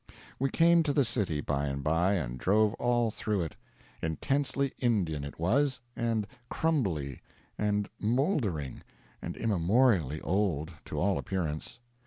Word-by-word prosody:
We 135 +1 +1
came 170 +2 +5
to 150 -3 0
the 140 -2 +3
city, 100 -11 0
by 70 0 -1
and 70 0 -3
by, 80 +6 +2
and 65 -10 -2
drove 105 - +3
all 120 -2 +2
through 105 -2 -1
it. 80 - -4 0.5
Intensely 135 - 0
Indian, 95 - +1
it 70 +2 -8
was, 130 - +2 0.2
and 115 -3 0 0.2
crumbly, 90 - 0 0.3
and 105 -1 0
mouldering, 110 - 0 0.4
and - - -5
immemorially 95 - +2
old, 85 -4 0
to - - -4
all 100 +1 +2
appearance. 95 +6 -3
105 Hz, 135 wpm, -30 LUFS, 80-120 Hz, 0.5 s, came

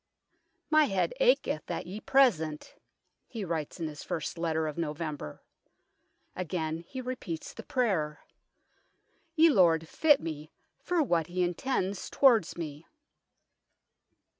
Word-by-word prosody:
" - - -47
My 310 - +7
head 195 - 0
aketh - - +2
at - - -3
ye 190 +5 -6
present," 175 - +2 0.5
he 225 -5 -5
writes 165 -1 -4
in 165 - -2
his 150 -1 -8
first 160 - -4
letter 160 -2 -1
of 155 -1 -3
November. 150 - -5 0.9
Again 165 -3 -3
he 260 - -6
repeats 245 -10 -5
the - - -8
prayer, 175 - -1 0.6
" 325 - -42
Ye 325 0 +6
Lord 165 - +4
fitt 295 - +4
mee 155 -2 -6 0.3
for 350 -3 +1
what 170 - +1
hee 180 +1 -1
intends 190 +1 -2
towards 235 - +4
me." 155 -2 -6
175 Hz, 130 wpm, -29 LUFS, 155-250 Hz, 0.9 s, My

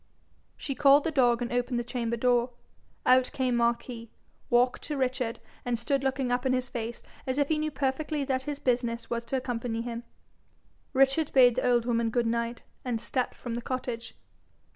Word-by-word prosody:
She 275 - -3
called 280 +2 +6
the 325 - -1
dog 245 -4 +3
and 240 - -4
opened 245 0 0
the 240 - 0
chamber 235 -1 -2
door. 245 +1 +2 0.5
Out 255 0 +5
came 255 -2 +1
Marquis, 235 0 -1 0.4
walked 245 +1 +3
to 295 -1 -3
Richard, 255 -3 -1 0.2
and 245 -1 0
stood 270 +4 0
looking 265 -2 0
up 245 0 +1
in 260 -1 +2
his 255 0 -1
face 235 0 -5 0.2
as 260 +1 -1
if 285 -1 +2
he 310 -1 +2
knew 310 0 0
perfectly 290 +1 -1
that 260 -1 0
his 290 - -3
business 240 -3 -1
was 235 0 -1
to 265 +3 -1
accompany 240 -2 -3
him. 235 -1 -4 0.9
Richard 270 +3 +3
bade 250 -2 +7
the 255 +1 0
old 240 -1 +3
woman 230 -1 +1
good 240 +1 +1
night, 235 0 -1 0.2
and 245 -3 -1
stepped 250 +2 -2
from 240 - -6
the 240 - -3
cottage. 240 -2 -4
245 Hz, 185 wpm, -28 LUFS, 235-265 Hz, 0.9 s, bade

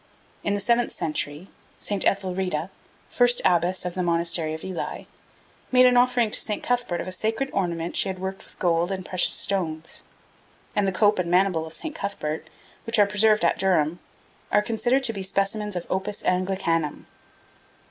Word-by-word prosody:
In 200 - 0
the - - -1
seventh 235 +3 +2
century, 150 +2 -3 0.3
St. 200 -2 -3
Ethelreda, 185 -3 -1 0.4
first 245 0 +4
abbess 180 +1 +2
of 180 - -3
the 185 - -2
Monastery 170 -2 0
of 160 - -10
Ely, 185 -2 -5 0.7
made 255 0 +6
an 250 0 +5
offering 245 -2 +3
to - - +2
St. 210 - -3
Cuthbert 245 -8 0
of - - -5
a - - -4
sacred 225 +8 -2
ornament 170 -2 -2
she 195 - +3
had 190 - -4
worked 190 +1 -5
with - - -16
gold 170 0 +1
and 190 -2 -4
precious 185 -1 +1
stones, 165 -5 -1 0.7
and 205 -2 +2
the - - +1
cope 205 +1 +3
and 175 -2 -1
maniple 180 -3 +2
of 160 - -11
St. 320 -2 -4
Cuthbert, 180 - -4 0.4
which 230 +1 +1
are 205 - +6
preserved 210 -1 +3
at - - +2
Durham, 175 -3 +2 0.5
are 210 - +4
considered 240 +5 +1
to 225 - +3
be 200 - -5
specimens 195 +2 -1
of 175 - -3
opus 195 +2 -3
Anglicanum. 180 -4 0
190 Hz, 175 wpm, -25 LUFS, 175-210 Hz, 0.7 s, made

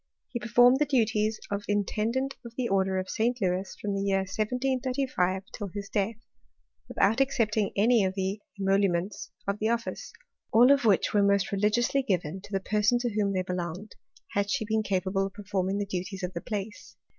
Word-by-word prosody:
He 240 - -4
performed 245 +3 +5
the 300 - +2
duties 220 -4 +1
of 200 0 -2
intend 210 +3 0 0.3
of 235 -1 -11
the 255 -2 0
order 190 -2 +1
of 185 0 -2
St. 240 +5 0
Louis 185 -1 -1
from 205 -1 -2
the 195 - -1
year 195 -1 +1
1 190 - -5
735 250 -4 -1
till 205 - -5 0.2
death, 210 +2 0 0.7
without 220 +6 +2
accepting 220 -6 +1
any 225 +2 +4
of 190 0 -1
the 195 +1 -2 0.2
emolument 195 -1 +1 0.4
the 220 - +1
office, 235 0 -3 0.4
all 245 +4 +7
of 280 -3 +3
which 200 -4 +3
were 205 - +4
most 200 0 +2
religiously 215 +7 +2
given 185 - -2
the 195 -1 -1
person 210 +4 +2
to 240 -2 -2
whom 205 -1 +1
they 185 -1 0
belonged, 180 +2 -5 0.4
had 200 0 -1
she 220 -1 0
beeti 210 -4 0
pable 195 0 0
of 195 - -12
performing 195 -2 -2
the 205 - -1
duties 190 0 -5
of 180 0 -3
the 170 - -4
place. 210 +1 -6
205 Hz, 180 wpm, -28 LUFS, 195-230 Hz, 0.7 s, all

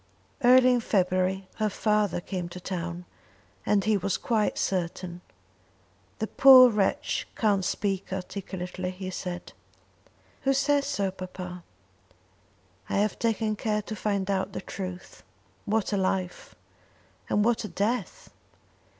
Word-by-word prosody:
Early 255 +1 +7
in 245 - +2
February 185 -2 0
her 215 -1 +1
father 210 -3 +1
came 180 -2 -4
to 180 - -8
town, 175 -1 -5 0.6
and 200 -2 +3
he 215 -1 +2
was 195 0 -1
quite 220 -3 0
certain. 180 -1 -2 1.0
"The 220 - -1
poor 255 +1 +8
wretch 205 -3 0
can't 205 -4 +2
speak 195 0 -2
articulately," 185 -1 -5
he 185 0 -6
said. 180 -1 -6 0.9
"Who 270 - +2
says 280 +1 +2
so, 200 -9 -1
papa?" 185 -1 -8 1.3
"I - - 0
have 210 +1 0
taken 220 -2 0
care 210 0 -1
to 215 - -6
find 200 -2 -1
out 190 0 -1
the - - -4
truth. 185 -2 -7 0.4
What 215 0 0
a - - +2
life! 185 -1 -2 0.7
And 210 - +2
what 235 -1 +2
a - - -4
death! 210 0 -3
195 Hz, 130 wpm, -27 LUFS, 185-215 Hz, 1.3 s, poor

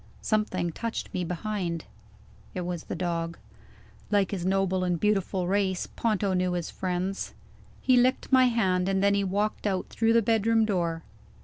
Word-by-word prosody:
Something 185 -5 0
touched 230 +7 -4
me 180 - -1
behind: 175 -1 -3 0.7
it 180 - -2
was 175 -2 -4
the - - -4
dog. 170 -2 -2 0.7
Like 200 -3 +2
his 185 -3 -2
noble 190 -1 +1
and 175 -2 0
beautiful 195 -2 +1
race, 190 -1 +1
Ponto 210 -4 0
knew 180 -1 +1
his 175 -2 -3
friends. 185 +1 -3 0.5
He 255 -1 +4
licked 255 +3 +2
my 260 -1 +7
hand, 190 -6 +2
and 195 0 +1
then 200 0 +4
he 200 0 +2
walked 205 +3 -1
out 190 -2 -1
through 225 0 +2
the 230 -1 +4
bedroom 225 +1 +3
door. 170 -5 -1
190 Hz, 165 wpm, -27 LUFS, 180-215 Hz, 0.7 s, my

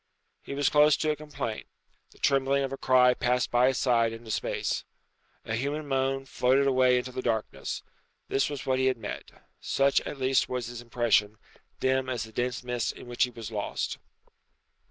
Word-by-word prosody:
He 140 - -7
was 145 0 +1
close 150 0 +5
to 155 - +1
a - - -1
complaint. 145 -7 -5 0.4
The - - -22
trembling 140 0 +2
of 135 0 -3
a - - -4
cry 125 -1 +5
passed 125 0 0
by 120 +1 +4
his 130 - +1
side 115 -3 +2
into 115 0 -8
space. - - -1 0.6
A 110 - -3
human 145 +6 -2
moan 135 0 0
floated 135 +1 +2
away 130 -2 +4
into 125 +1 -3
the 130 - -4
darkness. 115 -3 -2 0.4
This 135 - +1
was 145 -2 -5
what 130 0 +1
he 130 - +3
had 130 -2 +1
met. 105 -3 -6 0.3
Such 140 0 +2
at - - -6
least 130 0 +2
was 125 -2 -2
his 120 +1 -7
impression, 115 -3 +1 0.4
dim 130 0 +1
as 125 -3 -2
the 110 - -10
dense 125 +2 -2
mist 125 -2 -2
in - - -12
which 120 +1 +1
he - - -8
was 115 -2 -8
lost. 105 -2 -3
130 Hz, 190 wpm, -28 LUFS, 120-135 Hz, 0.6 s, close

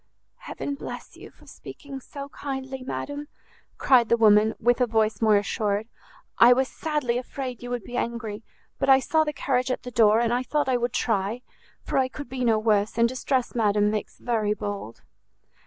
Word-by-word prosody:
"Heaven 285 - -5
bless 280 - -8
you - - -12
for - - -22
speaking 275 -2 -10
so 280 +2 -9
kindly, 265 -2 -6
madam!" 285 +3 -5 0.5
cried 245 -4 +4
the 235 - +4
woman, 215 -1 +5
with 245 +2 +2
a 250 - +4
voice 220 -1 +1
more 215 -2 +5
assured; 205 +1 -1 0.5
"I 240 +1 +8
was 260 +1 +1
sadly 285 -7 -2
afraid 255 -1 -6
you 245 - -7
would 245 -3 -3
be 245 - -6
angry, 230 -2 -3 0.4
but - - 0
I 265 0 +8
saw 315 +4 +2
the 300 - -2
carriage 255 -3 -1
at 255 - -2
the 250 - -7
door, 220 -2 +4
and 235 0 +1
I 245 - +1
thought 295 +3 -1
I 255 -1 +2
would 240 0 -2
try; 220 +2 -1 0.4
for - - 0
I 260 - +2
could 280 0 -9
be 255 -1 -3
no 225 -2 +3
worse; 215 -1 +1
and 235 0 +4
distress, 255 0 -1
madam, 210 -2 +2
makes 215 -1 -4
very 215 -3 0
bold." 205 - -6
240 Hz, 190 wpm, -25 LUFS, 220-265 Hz, 0.5 s, I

